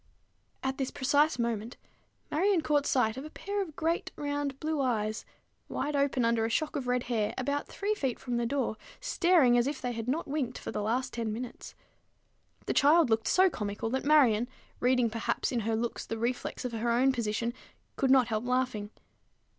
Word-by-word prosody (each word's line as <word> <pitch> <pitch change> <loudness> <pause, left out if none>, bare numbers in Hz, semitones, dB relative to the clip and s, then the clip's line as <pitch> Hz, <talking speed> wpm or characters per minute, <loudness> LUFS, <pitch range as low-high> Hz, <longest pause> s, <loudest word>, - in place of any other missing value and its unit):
At 265 +1 -2
this 265 - 0
precise 290 +3 +2
moment, 235 -1 -2 0.5
Marion 370 +2 +3
caught 295 -2 +1
sight 235 -3 +2
of 265 - -5
a 305 - -8
pair 405 +5 -3
of 325 -6 -6
great 330 +1 -1
round 285 -2 -3
blue 310 -2 -1
eyes, 215 -4 -1 0.4
wide 295 0 -2
open 280 -3 +2
under 230 -1 +2
a 225 - 0
shock 305 +7 -1
of 265 -3 -3
red 250 0 +1
hair, 225 -4 -1
about 285 +3 -1
three 410 +2 -1
feet 270 - -2
from 245 -2 -3
the 235 0 0
floor, 255 -4 -1 0.2
staring 345 - +4
as 240 - +1
if 285 -1 -3
they 245 - -2
had 230 -1 -5
not 300 +7 -1
winked 280 -3 -2
for - - -6
the - - -2
last 235 +5 -1
ten 230 -2 -2
minutes. 240 +3 -7 0.9
The - - 0
child 300 -2 +5
looked 220 0 +2
so 375 +1 +5
comical, 210 - -3
that 265 - -1
Marion, 250 -7 +4 0.3
reading 250 -2 +2
perhaps 230 0 -1
in 245 - 0
her 225 0 0
looks 230 +1 -2
the 225 - -3
reflex 245 +2 -2
of 250 - -2
her 230 +1 -1
own 250 +3 +4
position, 235 -1 -1 0.4
could 270 - +1
not 260 -2 +5
help 215 0 -1
laughing. 250 -4 -1
250 Hz, 195 wpm, -30 LUFS, 230-290 Hz, 0.9 s, child